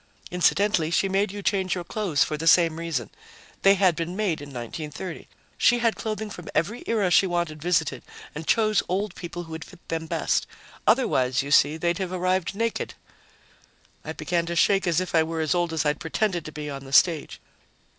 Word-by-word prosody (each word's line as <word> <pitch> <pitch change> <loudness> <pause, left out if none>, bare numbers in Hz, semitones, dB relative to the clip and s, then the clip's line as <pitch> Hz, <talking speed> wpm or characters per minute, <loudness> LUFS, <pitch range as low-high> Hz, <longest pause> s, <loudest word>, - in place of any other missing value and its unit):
"Incidentally, 180 -1 +2
she 170 +3 +2
made 195 +1 +1
you 205 0 -7
change 190 -3 +1
your 180 - -4
clothes 175 -5 0
for 155 - -3
the 160 +2 -4
same 165 -1 +5
reason 160 -9 -3 0.5
they 195 0 +6
had 185 -3 +3
been 170 +2 -4
made 195 -8 -1
in 145 - -8
1930. 150 +7 -7 0.3
She 245 - +5
had 230 -2 +1
clothing 215 -1 -4
from 175 -4 -9
every 190 +10 0
era 210 -5 +1
she 190 - +5
wanted 170 -4 -2
visited 160 -6 0 0.3
and 160 +1 -7
chose 215 -2 +3
old 195 +1 -1
people 175 0 -7
who 165 - -12
would 160 0 -6
fit 185 -2 -17
them 160 0 -3
best. - - 0 0.4
Otherwise, 130 - +2
you 140 - -6
see, 150 +1 +5
they'd 170 +2 0
have 185 -2 -3
arrived 185 0 0
naked." 230 +2 -2 1.1
I - - -5
began 170 -1 -1
to 170 - -3
shake 195 +2 +3
as 170 -1 +2
if 185 - -4
I 165 - +5
were 160 +1 -2
as 155 -3 +1
old 175 -1 0
as 160 -2 -1
I'd 150 0 +1
pretended 175 +1 -1
to 155 - -7
be 150 0 -6
on 140 -1 -6
the 135 0 -10
stage. 165 0 +3
175 Hz, 200 wpm, -25 LUFS, 160-195 Hz, 1.1 s, they